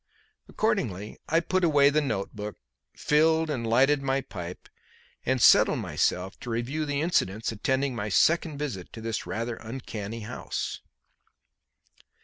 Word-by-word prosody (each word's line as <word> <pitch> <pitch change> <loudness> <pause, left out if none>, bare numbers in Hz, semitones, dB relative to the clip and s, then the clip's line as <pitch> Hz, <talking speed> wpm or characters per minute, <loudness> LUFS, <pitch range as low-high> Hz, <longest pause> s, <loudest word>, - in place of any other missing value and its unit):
Accordingly 115 - -2
I 165 - +4
put 185 +2 0
away 145 -4 +5
the 155 +1 +2
notebook, 105 -4 -4 0.4
filled 160 +1 +3
and 120 -5 -2
lighted 135 +5 +4
my 135 0 0
pipe, 90 -7 -8 0.6
and 130 +1 +2
settled - - +6
myself 95 +2 -1
to 120 - -8
review 130 +7 -2
the 145 0 -1
incidents 115 - 0
attending 130 +4 0
my 105 -1 -3
second 160 - +3
visit 125 -12 -5
to 110 - -8
this 115 -1 -3
rather 115 +1 -3
uncanny 115 -2 -6
house. 110 - -4
130 Hz, 130 wpm, -27 LUFS, 110-150 Hz, 0.6 s, settled